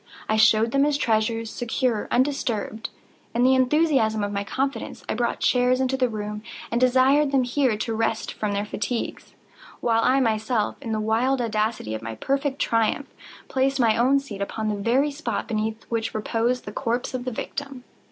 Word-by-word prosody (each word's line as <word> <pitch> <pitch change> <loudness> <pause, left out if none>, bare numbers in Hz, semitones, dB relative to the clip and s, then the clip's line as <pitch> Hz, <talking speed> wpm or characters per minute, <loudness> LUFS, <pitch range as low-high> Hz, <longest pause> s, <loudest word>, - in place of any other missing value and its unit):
I 215 - +1
showed 220 +1 +4
them 275 +2 +3
his 290 -1 +2
treasures, 225 -2 0
secure, 240 -2 -1
undisturbed. 245 -5 -1 0.5
In 240 - +3
the 260 +1 +5
enthusiasm 260 -5 +2
of 205 - -2
my 200 0 -2
confidence, 260 +3 -3
I - - -1
brought 240 +1 -1
chairs 250 0 +3
into 260 0 +1
the 255 -2 +1
room, 210 -1 -5 0.3
and 235 +1 0
desired 265 +3 +4
them 270 -2 +3
here 250 -2 +1
to 225 +2 -2
rest 225 0 -1
from 210 -1 -2
their 200 +1 -1
fatigues, 220 +3 -4 0.4
while 230 -1 +2
I 265 +2 +4
myself, 220 -2 0
in 235 -5 -5
the 220 - 0
wild 230 +5 +1
audacity 215 - -1
of 110 - -4
my 115 0 -6
perfect 275 - -1
triumph, 230 +4 0 0.3
placed 270 +1 0
my 225 -3 +4
own 260 +4 +4
seat 215 -8 -8
upon 215 +2 -2
the 210 - 0
very 265 +7 +2
spot 295 +3 -3
beneath 220 0 -2
which 225 -1 -2
reposed 230 +3 0
the 205 - -6
corpse 240 +2 -2
of 255 -1 -3
the 255 - -3
victim. 270 +2 -6
235 Hz, 180 wpm, -24 LUFS, 220-265 Hz, 0.5 s, the